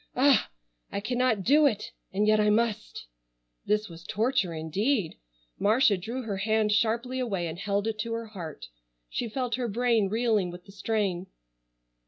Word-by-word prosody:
Ah! 270 Hz, 0 st, +4 dB, 0.4 s
I -, -, -2 dB
cannot 245 Hz, -1 st, 0 dB
do 295 Hz, +7 st, +5 dB
it, 215 Hz, -5 st, -2 dB, 0.2 s
and 205 Hz, +2 st, +1 dB
yet 215 Hz, 0 st, +4 dB
I 210 Hz, 0 st, +4 dB
must." 220 Hz, 0 st, 0 dB, 0.6 s
This 210 Hz, 0 st, +1 dB
was 165 Hz, -1 st, -11 dB
torture 220 Hz, -2 st, 0 dB
indeed! 175 Hz, -, 0 dB, 0.5 s
Marcia 220 Hz, +1 st, +4 dB
drew 230 Hz, +8 st, -5 dB
her 205 Hz, -4 st, -3 dB
hand 215 Hz, +1 st, +1 dB
sharply 235 Hz, +4 st, +1 dB
away 200 Hz, -9 st, -1 dB
and 165 Hz, +1 st, -5 dB
held 200 Hz, +1 st, -1 dB
it 220 Hz, -1 st, -2 dB
to 230 Hz, +2 st, -2 dB
her 230 Hz, 0 st, -3 dB
heart. 180 Hz, -8 st, -8 dB, 0.5 s
She 235 Hz, -, -2 dB
felt 250 Hz, +1 st, -2 dB
her 250 Hz, -2 st, -1 dB
brain 230 Hz, -2 st, +2 dB
reeling 220 Hz, -4 st, +1 dB
with 175 Hz, +1 st, -10 dB
the 195 Hz, -, -13 dB
strain. 195 Hz, -3 st, -1 dB
215 Hz, 165 wpm, -28 LUFS, 195-235 Hz, 0.6 s, do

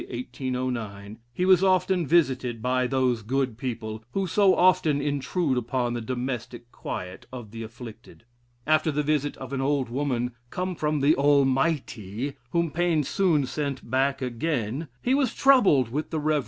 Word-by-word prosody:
1809) 120 Hz, -5 st, -4 dB
he 180 Hz, +9 st, -1 dB
was 185 Hz, -1 st, +5 dB
often 185 Hz, -3 st, +2 dB
visited 130 Hz, -7 st, +2 dB
by 125 Hz, +2 st, +1 dB
those 130 Hz, -3 st, +1 dB
"good 130 Hz, +2 st, -1 dB
people" 110 Hz, -3 st, -5 dB
who 195 Hz, -1 st, 0 dB
so 190 Hz, +1 st, +4 dB
often 165 Hz, -5 st, +3 dB
intrude 145 Hz, 0 st, 0 dB
upon 120 Hz, 0 st, -1 dB
the 120 Hz, -, -3 dB
domestic 120 Hz, 0 st, -5 dB
quiet 90 Hz, 0 st, -7 dB
of 120 Hz, -5 st, -8 dB
the 115 Hz, 0 st, -7 dB
afflicted. 115 Hz, 0 st, -11 dB, 0.4 s
After 155 Hz, +1 st, +3 dB
the 150 Hz, +1 st, -1 dB
visit 145 Hz, -1 st, 0 dB
of 130 Hz, +1 st, -8 dB
an 135 Hz, -, -1 dB
old 135 Hz, -2 st, 0 dB
woman, 125 Hz, -2 st, -1 dB, 0.2 s
"come 185 Hz, +4 st, -3 dB
from 150 Hz, -2 st, -1 dB
the 145 Hz, +3 st, +4 dB
Almighty," 135 Hz, -, +1 dB, 0.2 s
(whom 170 Hz, +2 st, 0 dB
Paine 170 Hz, -1 st, +1 dB
soon 160 Hz, -3 st, +2 dB
sent 140 Hz, -2 st, -4 dB
back 135 Hz, +1 st, +1 dB
again) 130 Hz, +1 st, -2 dB, 0.2 s
he 255 Hz, -, +2 dB
was 270 Hz, -4 st, +1 dB
troubled 200 Hz, -, +5 dB
with 150 Hz, +6 st, -3 dB
the 160 Hz, -, -2 dB
Rev. 155 Hz, +1 st, +1 dB
Mr. 150 Hz, -, +2 dB
135 Hz, 160 wpm, -26 LUFS, 120-155 Hz, 0.4 s, was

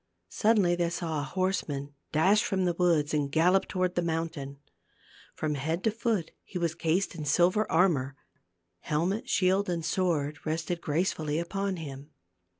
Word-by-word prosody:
Suddenly 210 Hz, -6 st, +3 dB
they 170 Hz, -1 st, +1 dB
saw 170 Hz, -3 st, -2 dB
a -, -, -2 dB
horseman 150 Hz, -6 st, -2 dB, 0.2 s
dash 190 Hz, +7 st, +4 dB
from 190 Hz, -2 st, 0 dB
the 175 Hz, -, +2 dB
woods 165 Hz, -4 st, +2 dB
and 145 Hz, -2 st, 0 dB
gallop 180 Hz, +5 st, +3 dB
toward 185 Hz, -1 st, 0 dB
the 175 Hz, -, 0 dB
mountain. 160 Hz, -4 st, -3 dB, 0.8 s
From 155 Hz, -1 st, -1 dB
head 160 Hz, +5 st, -2 dB
to 220 Hz, -, +2 dB
foot 220 Hz, -6 st, -1 dB
he 185 Hz, -, -7 dB
was 170 Hz, -2 st, 0 dB
cased 170 Hz, +5 st, 0 dB
in 165 Hz, -3 st, -6 dB
silver 175 Hz, +8 st, +2 dB
armor; 155 Hz, -6 st, +2 dB, 0.6 s
helmet, 175 Hz, -, -1 dB
shield 190 Hz, 0 st, +2 dB
and 170 Hz, -2 st, -2 dB
sword 155 Hz, -5 st, 0 dB
rested 165 Hz, +2 st, -2 dB
gracefully 155 Hz, -1 st, -1 dB
upon 195 Hz, +3 st, -2 dB
him. 145 Hz, -3 st, -8 dB
170 Hz, 155 wpm, -29 LUFS, 150-185 Hz, 0.8 s, dash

